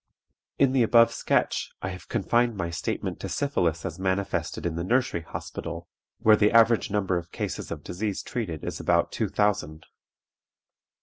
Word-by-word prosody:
"In 135 -2 +4
the 130 -1 +3
above 115 0 +5
sketch - - 0
I 95 - -1
have 90 -4 -9
confined 120 -1 +1
my 85 -3 -2
statement 80 - -3
to - - -5
syphilis 85 - 0
as 85 - -5
manifested 95 0 -1
in 85 - 0
the 85 - -2
Nursery 120 -3 +1
Hospital, 80 - -7 0.3
where 110 -1 +6
the 105 0 +3
average 115 0 +5
number 95 -3 0
of 85 0 -13
cases - - -4
of - - -6
disease 100 +3 -3
treated 90 -11 -4
is - - -4
about - - +2
two - - -1
thousand. 100 -7 0
100 Hz, 165 wpm, -26 LUFS, 85-115 Hz, 0.3 s, where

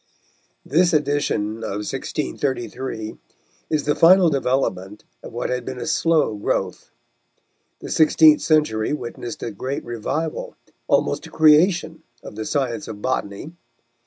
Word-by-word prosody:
This 175 +4 +2
edition 145 -8 0
of 105 -2 -4
1633 130 -4 -4 0.5
is 155 -2 0
the 150 - +1
final 175 +1 +6
development 105 -8 -1 0.2
of - - -10
what 120 - -3
had 125 -1 -2
been 130 +1 -6
a - - -4
slow 160 -6 +2
growth. 105 - -3 0.9
The - - -7
sixteenth 155 -1 +5
century 150 -8 +1
witnessed 120 -3 -6
a 115 - -3
great 130 +7 -5
revival, 130 +7 -4 0.3
almost - - +1
a - - -13
creation 160 +2 +3 0.2
of - - -9
the 110 0 -5
science 135 0 -2
of 105 - -7
botany. 130 +3 -3
135 Hz, 130 wpm, -22 LUFS, 110-155 Hz, 0.9 s, final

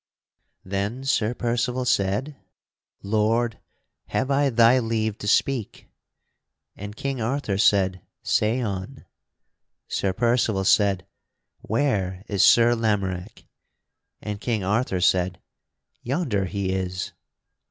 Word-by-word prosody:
Then 100 +7 -3
Sir 125 -4 0
Percival 120 +2 -1
said: 125 +4 0 0.7
"Lord, 110 +3 +1 0.5
have 135 +2 -1
I 140 0 +3
thy 120 +1 +5
leave 110 -2 -1
to 105 - -5
speak?" 120 +1 0 0.9
And 105 +1 -8
King 135 0 -3
Arthur 110 -4 -1
said, 95 -3 +3 0.2
"Say 115 +4 +1
on." 100 +2 -5 0.8
Sir 100 - -1
Percival 115 -3 +1
said, 100 -2 +3 0.5
"Where 100 -7 -1
is 100 -2 0
Sir 120 0 +6
Lamorack?" 105 -4 -2 0.8
And 105 -1 -5
King 110 -4 -1
Arthur 100 -1 0
said, 90 0 +2 0.6
"Yonder 120 - -1
he 95 +1 -2
is." 90 -1 -3
110 Hz, 105 wpm, -24 LUFS, 95-120 Hz, 0.9 s, Sir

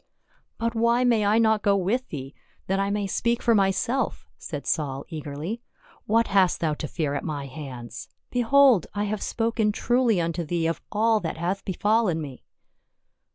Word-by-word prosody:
" - - -37
But 230 0 -1
why 235 +2 +2
may 235 -4 +3
I 210 +2 +4
not 220 -2 +3
go 200 -1 +3
with 225 +8 -1
thee, 135 -2 -6 0.3
that 195 +1 0
I 195 0 0
may 205 0 -1
speak 235 +5 0
for 235 - +4
myself?" 210 +5 0
said 145 -3 -7
Saul 140 -3 -1
eagerly. 155 +7 -5 0.2
" - - -26
What 230 +1 +2
hast 195 -2 +3
thou 160 -2 0
to 150 - -5
fear 150 -4 -2
at 145 - -3
my 145 -3 -4
hands? 125 -4 -8 0.2
behold, 245 - +4
I 205 - 0
have 210 0 -2
spoken 225 -2 0
truly 240 -1 +2
unto 170 0 -1
thee 165 +1 -1
of 165 0 -1
all 220 +1 +3
that 165 -4 -4
hath 180 +4 -2
befallen 205 -2 +1
mc." 140 -5 -7
195 Hz, 180 wpm, -25 LUFS, 160-230 Hz, 0.3 s, I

